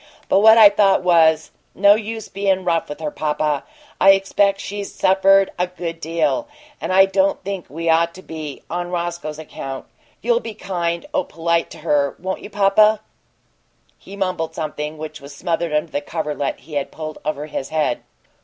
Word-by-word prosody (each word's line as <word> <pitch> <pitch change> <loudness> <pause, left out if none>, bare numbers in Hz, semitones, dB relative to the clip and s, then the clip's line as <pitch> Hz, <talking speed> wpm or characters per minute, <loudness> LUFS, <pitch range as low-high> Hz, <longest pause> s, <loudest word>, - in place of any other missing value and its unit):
But - - +4
what 220 +2 +7
I 215 -2 +10
thought 200 -2 +3
was, 160 -3 +4 0.2
no 200 +1 +6
use 220 +1 -4
bein' 195 -1 0
rough 165 -2 0
with 145 0 -7
her, 150 -1 -3
papa 150 -1 -1 0.4
I 195 0 +8
expect 195 0 +1
she's 200 0 -5
suffered 195 +1 +4
a 180 - +1
good 170 -2 -6
deal 165 - -1 0.3
and - - -3
I 190 +1 +7
don't 195 0 +1
think 195 -2 -5
we'd 165 +3 -1
ought 170 +1 +2
to 185 - -12
be, 155 -3 -7
on 175 +1 -4
Roscoe's 170 -3 -4
account. 135 -4 -7 0.4
You'll 480 -1 +3
you'll - - +1
be 225 - -8
kind 170 -4 -3
o' 290 -1 +1
polite 170 0 -1
to - - -11
her, 145 -3 +1
won't 190 +1 -4
you, - - -9
papa?" 210 +1 +4 1.0
He 195 - -11
mumbled 185 -5 -2
something 150 -1 -4
which 155 -2 -8
was 140 0 -11
smothered 170 +1 -2
under 150 +2 -1
the 145 - -2
coverlet 150 -2 -3
he 150 +4 -14
had 145 -1 -2
pulled 155 -1 -7
over 150 -1 -3
his 145 -3 -5
head. 155 -6 0
170 Hz, 180 wpm, -20 LUFS, 155-195 Hz, 1.0 s, I